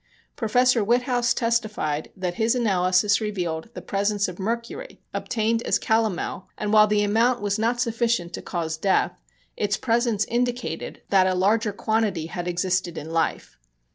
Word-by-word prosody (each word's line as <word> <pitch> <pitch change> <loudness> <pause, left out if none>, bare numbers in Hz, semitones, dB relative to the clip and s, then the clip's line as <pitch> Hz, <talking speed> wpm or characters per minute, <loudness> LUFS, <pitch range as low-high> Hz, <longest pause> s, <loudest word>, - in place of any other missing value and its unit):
Professor 245 +1 +3
Witthaus 245 +2 +1
testified 215 -10 -1
that 180 -2 -2
his 225 +6 +1
analysis 200 -2 +2
revealed 180 -5 -3
the - - -7
presence 200 0 0
of 180 0 -8
mercury, 235 - -4
obtained 225 0 0
as 200 - +1
calomel, 220 -4 -1
and 210 0 -2
while 215 0 +7
the 210 0 +2
amount 230 +4 +2
was 205 0 -1
not 235 +2 +1
sufficient 230 -6 0
to - - -5
cause 160 -3 -3
death, 190 +4 +2 0.4
its - - 0
presence 230 -3 +1
indicated 245 +2 -3
that 190 -2 +5
a 185 - +1
larger 210 +4 +2
quantity 205 -5 -1
had 175 +1 -5
existed 180 -1 -1
in 155 +2 -6
life. 165 - -2
210 Hz, 150 wpm, -24 LUFS, 185-230 Hz, 0.4 s, while